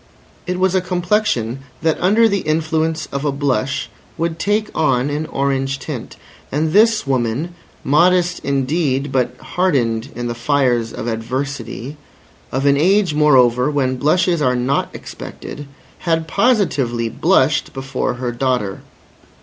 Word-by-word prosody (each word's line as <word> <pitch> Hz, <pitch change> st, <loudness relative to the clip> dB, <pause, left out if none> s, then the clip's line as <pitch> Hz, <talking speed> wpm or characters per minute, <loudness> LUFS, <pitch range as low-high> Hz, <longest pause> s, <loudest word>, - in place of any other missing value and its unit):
It 180 Hz, 0 st, -1 dB
was 190 Hz, 0 st, +2 dB
a 190 Hz, -, +2 dB
complexion, 180 Hz, -, 0 dB, 0.2 s
that 160 Hz, -1 st, +1 dB
under 215 Hz, +5 st, +4 dB
the 200 Hz, -2 st, 0 dB
influence 155 Hz, 0 st, 0 dB
of 140 Hz, 0 st, -3 dB
a 145 Hz, -, +1 dB
blush 135 Hz, -1 st, -1 dB, 0.3 s
would 165 Hz, 0 st, -2 dB
take 210 Hz, +2 st, 0 dB
on 135 Hz, -2 st, +1 dB
an 150 Hz, +2 st, -2 dB
orange 135 Hz, 0 st, -1 dB
tint. -, -, -7 dB, 0.4 s
And 155 Hz, +3 st, 0 dB
this 220 Hz, -1 st, +4 dB
woman, 130 Hz, +5 st, -1 dB, 0.3 s
modest 175 Hz, +4 st, +3 dB
indeed 140 Hz, 0 st, 0 dB
but 130 Hz, -2 st, 0 dB
hardened 130 Hz, -9 st, 0 dB
in 120 Hz, -, -4 dB
the 120 Hz, -, -2 dB
fires 120 Hz, -2 st, +1 dB
of -, -, -6 dB
adversity, 125 Hz, +3 st, -4 dB, 0.5 s
of 135 Hz, +2 st, -1 dB
an 140 Hz, 0 st, +4 dB
age, 185 Hz, +2 st, +3 dB
moreover, 130 Hz, -4 st, +4 dB
when 130 Hz, -3 st, 0 dB
blushes 170 Hz, +4 st, +2 dB
are 125 Hz, -3 st, +2 dB
not 125 Hz, +3 st, 0 dB
expected, 145 Hz, -1 st, -8 dB, 0.3 s
had 165 Hz, -2 st, 0 dB
positively 160 Hz, -, +1 dB
blushed -, -, +2 dB
before 135 Hz, -1 st, -3 dB
her 125 Hz, 0 st, -3 dB
daughter. 120 Hz, -5 st, -1 dB
140 Hz, 135 wpm, -19 LUFS, 130-170 Hz, 0.5 s, under